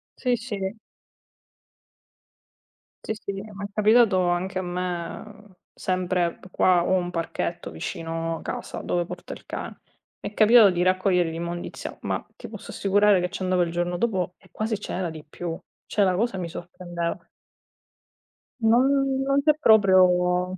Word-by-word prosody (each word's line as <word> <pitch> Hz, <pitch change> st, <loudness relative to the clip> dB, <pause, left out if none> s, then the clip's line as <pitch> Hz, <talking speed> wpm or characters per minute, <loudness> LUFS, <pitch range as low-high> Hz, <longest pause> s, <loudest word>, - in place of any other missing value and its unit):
Sì, 250 Hz, -2 st, +1 dB
sì. 215 Hz, -3 st, -4 dB, 2.3 s
Sì, -, -, -2 dB
sì, 210 Hz, -2 st, -6 dB
m'è 200 Hz, -1 st, -7 dB
capitato 215 Hz, -3 st, +4 dB
anche 180 Hz, +2 st, -1 dB
a -, -, 0 dB
me, 180 Hz, +3 st, -5 dB, 0.2 s
sempre 180 Hz, -2 st, -1 dB
p 185 Hz, -, -14 dB
qua 180 Hz, -1 st, +3 dB
ho 185 Hz, -, +1 dB
un 175 Hz, -1 st, -1 dB
parchetto 165 Hz, -1 st, -3 dB
vicino 165 Hz, -, -4 dB
casa, -, -, -5 dB
dove 175 Hz, -1 st, -1 dB
porto 180 Hz, 0 st, -8 dB
il -, -, -13 dB
cane. -, -, -6 dB, 0.4 s
M'è -, -, -6 dB
capitato 215 Hz, -1 st, +7 dB
di 175 Hz, -1 st, -1 dB
raccogliere 185 Hz, -1 st, +2 dB
l'immondizia, 170 Hz, +1 st, -5 dB
ma -, -, -3 dB
ti -, -, -10 dB
posso -, -, -9 dB
assicurare 205 Hz, -1 st, +3 dB
che 180 Hz, -, -1 dB
ci 190 Hz, 0 st, -5 dB
andavo 185 Hz, -1 st, +2 dB
il 170 Hz, -1 st, 0 dB
giorno 175 Hz, +1 st, -1 dB
dopo 185 Hz, -5 st, -1 dB
e -, -, -23 dB
quasi 215 Hz, -1 st, -2 dB
ce -, -, -6 dB
n'era 180 Hz, -2 st, -2 dB
di 155 Hz, -1 st, -9 dB
più. 165 Hz, +2 st, -6 dB, 0.3 s
Cioè 205 Hz, -, +1 dB
la 185 Hz, -2 st, +2 dB
cosa 220 Hz, +1 st, 0 dB
mi 175 Hz, -2 st, -4 dB
sorprendeva. 175 Hz, 0 st, -5 dB, 1.4 s
No, 225 Hz, +1 st, +5 dB
no, 275 Hz, +1 st, +3 dB
no, 270 Hz, 0 st, 0 dB
non 275 Hz, +1 st, +3 dB
c'è 305 Hz, +1 st, +5 dB
proprio 185 Hz, -, +4 dB
185 Hz, 155 wpm, -25 LUFS, 175-210 Hz, 2.3 s, capitato